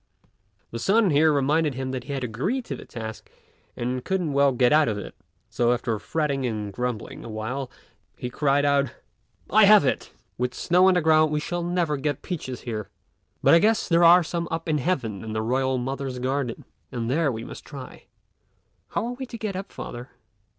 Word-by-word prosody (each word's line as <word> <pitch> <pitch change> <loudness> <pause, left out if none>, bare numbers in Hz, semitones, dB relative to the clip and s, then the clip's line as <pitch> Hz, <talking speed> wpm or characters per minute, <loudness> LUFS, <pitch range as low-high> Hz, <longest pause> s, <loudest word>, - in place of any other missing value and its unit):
His 115 0 -5
son 205 -1 +4
here 155 +2 +5
reminded 145 +1 +1
him 130 0 -3
that 130 -2 -5
he 140 - -5
had 135 -2 -3
agreed 180 - -2
to 135 - -4
the - - -11
task 110 -2 -8 0.5
and 125 +1 -2
couldn't 180 -6 -1
well 140 0 +4
get 125 +1 +3
out 155 0 +5
of 105 -2 -1
it; 105 - -7 0.3
so, 120 +2 +2
after 115 -3 -2
fretting 145 0 -1
and 105 -4 -3
grumbling 125 0 -4
awhile, 115 +4 -4 0.5
he - - -4
cried 140 +2 +1
out, 140 -2 +3 0.6
"I 215 +1 +7
have 205 -6 +7
it! 130 - -1 0.3
with 125 0 -1
snow 180 +2 +4
on 190 - +5
the 180 - +3
ground 155 -1 +4
we 150 - +1
shall 175 +3 -3
never 170 -3 0
get 145 0 -2
peaches 130 -8 -5
here; 110 -4 -5 0.5
but - - +6
I 165 - +8
guess 220 +4 +2
there 170 0 +4
are 175 +1 +8
some 170 +1 -3
up 165 0 -4
in 155 -2 +1
heaven 125 - -2
in 110 -1 -5
the 110 0 -1
Royal 130 +2 +1
Mother's 135 +1 -3
garden, 130 -1 -2 0.3
and 115 -2 -3
there 145 +3 +1
we 115 -1 -5
must - - -9
try." 135 -4 -10 0.8
"How - - -2
are 240 - -3
we 260 +1 -7
to 235 - -7
get 215 -3 -4
up, 195 +1 -6
father?" 120 +1 -7
140 Hz, 200 wpm, -25 LUFS, 125-165 Hz, 0.8 s, I